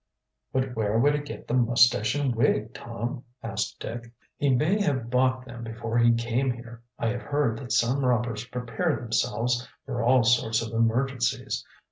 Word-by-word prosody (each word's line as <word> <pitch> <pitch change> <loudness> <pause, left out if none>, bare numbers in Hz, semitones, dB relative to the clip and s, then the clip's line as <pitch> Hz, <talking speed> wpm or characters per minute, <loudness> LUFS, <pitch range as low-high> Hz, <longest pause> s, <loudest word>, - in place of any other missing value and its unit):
"But 130 -1 -1
where 110 0 +1
would 145 +5 +4
he 145 - 0
get 145 - -9
the - - -3
mustache 120 -2 +4
and 140 -3 +1
wig, 115 -1 +1
Tom?" 120 +3 -5 0.2
asked - - -3
Dick. 115 0 -6 0.2
"He 145 - +1
may 155 +11 +2
have 130 - -1
bought 130 0 +2
them 120 -2 -9
before 115 0 -2
he 120 0 +6
came 115 +3 0
here. 120 -1 -6 0.2
I 115 - 0
have 125 +1 -3
heard 145 -6 0
that 125 -3 -7
some 120 +4 +2
robbers 120 -3 0
prepare 125 +7 -1
themselves 120 +1 -1 0.2
for 125 -3 -3
all 125 +1 +4
sorts 115 -1 +2
of 110 0 -6
emergencies. 125 +2 0
120 Hz, 170 wpm, -26 LUFS, 115-130 Hz, 0.2 s, he